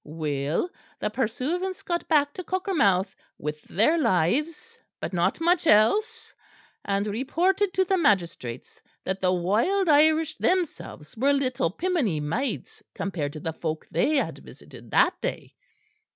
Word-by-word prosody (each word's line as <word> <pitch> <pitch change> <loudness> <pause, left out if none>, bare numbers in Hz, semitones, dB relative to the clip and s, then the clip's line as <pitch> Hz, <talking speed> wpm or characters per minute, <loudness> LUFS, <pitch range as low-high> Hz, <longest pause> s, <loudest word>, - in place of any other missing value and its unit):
"Well, 150 - -2 0.3
the 210 - -2
pursuivants 275 - -2
got 345 -1 -2
back 290 -3 +3
to 365 - -6
Cockermouth 275 - +1 0.2
with 150 +1 -5
their 270 - +2
lives, 300 - 0 0.2
but - - -5
not 175 - +1
much 340 0 +2
else; 425 - +3 0.5
and 200 0 -1
reported 345 - 0
to 375 - +3
the 380 0 +1
magistrates 170 - -1 0.2
that 190 0 -3
the 185 -1 +3
wild 225 - +1
Irish 310 +1 +4
themselves 340 - -2
were 275 +5 +2
little 255 -9 0
piminy 265 - -1
maids 190 - -3
compared 155 -7 -3
to 155 - -7
the 160 +2 -4
folk 160 -1 -4
they 310 - +2
had 275 - -1
visited - - -14
that - - +2
day. - - -4
255 Hz, 135 wpm, -26 LUFS, -, 0.5 s, Irish